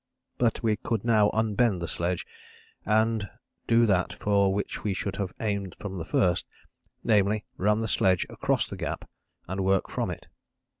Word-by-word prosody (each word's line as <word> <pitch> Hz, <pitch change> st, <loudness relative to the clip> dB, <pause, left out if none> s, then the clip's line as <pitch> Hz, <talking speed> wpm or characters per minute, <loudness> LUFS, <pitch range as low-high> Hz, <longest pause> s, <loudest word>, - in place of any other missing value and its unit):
But 120 Hz, -1 st, +1 dB
we 110 Hz, -2 st, +2 dB
could 115 Hz, 0 st, -2 dB
now 110 Hz, -3 st, +4 dB
unbend 110 Hz, -2 st, +1 dB
the 85 Hz, -, -3 dB
sledge, 85 Hz, +2 st, -2 dB, 0.6 s
and 110 Hz, -1 st, +2 dB, 0.4 s
do 115 Hz, 0 st, +5 dB
that 95 Hz, -4 st, +2 dB
for 100 Hz, -1 st, +2 dB
which 100 Hz, +1 st, -3 dB
we 100 Hz, -2 st, 0 dB
should 100 Hz, +1 st, -3 dB
have 100 Hz, -3 st, -2 dB
aimed 100 Hz, -4 st, -2 dB
from 95 Hz, -3 st, -5 dB
the 80 Hz, -, -4 dB
first, 90 Hz, 0 st, +1 dB, 0.6 s
namely, 105 Hz, -1 st, +2 dB
run 105 Hz, +3 st, +2 dB
the 110 Hz, -, -1 dB
sledge 95 Hz, -3 st, +2 dB
across -, -, 0 dB
the -, -, -7 dB
gap -, -, -4 dB, 0.4 s
and 95 Hz, +1 st, -2 dB
work 95 Hz, 0 st, +1 dB
from -, -, -1 dB
it. -, -, -6 dB
100 Hz, 165 wpm, -27 LUFS, 95-110 Hz, 0.6 s, do